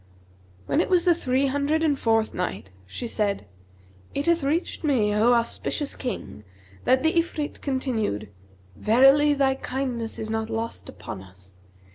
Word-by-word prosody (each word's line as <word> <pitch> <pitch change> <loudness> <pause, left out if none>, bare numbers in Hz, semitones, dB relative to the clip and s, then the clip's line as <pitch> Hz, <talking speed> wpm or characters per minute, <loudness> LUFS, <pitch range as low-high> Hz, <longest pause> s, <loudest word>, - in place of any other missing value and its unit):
When 310 - +2
it - - -2
was 360 -1 +3
the 350 - +6
Three 265 -4 0
Hundred 285 +4 +1
and 310 -2 +3
fourth 225 -1 +2
Night, 180 - -4 0.2
She 240 - -6
said, 210 -3 -1 0.7
It 280 - -1
hath 340 -2 +2
reached 315 +6 -1
me, 235 -9 +2
O 225 +4 +4
auspicious 240 +4 -1
King, 245 - -5 0.4
that 260 +2 +4
the 320 - +3
Ifrit 310 -3 -3
continued, 230 - -1 0.5
"'Verily 270 +6 +5
thy 270 -1 +3
kindness 255 -4 -4
is 220 0 -4
not 220 0 -2
lost 225 0 -4
upon 95 - -8
us.' 95 -1 -13
255 Hz, 150 wpm, -25 LUFS, 220-290 Hz, 0.7 s, the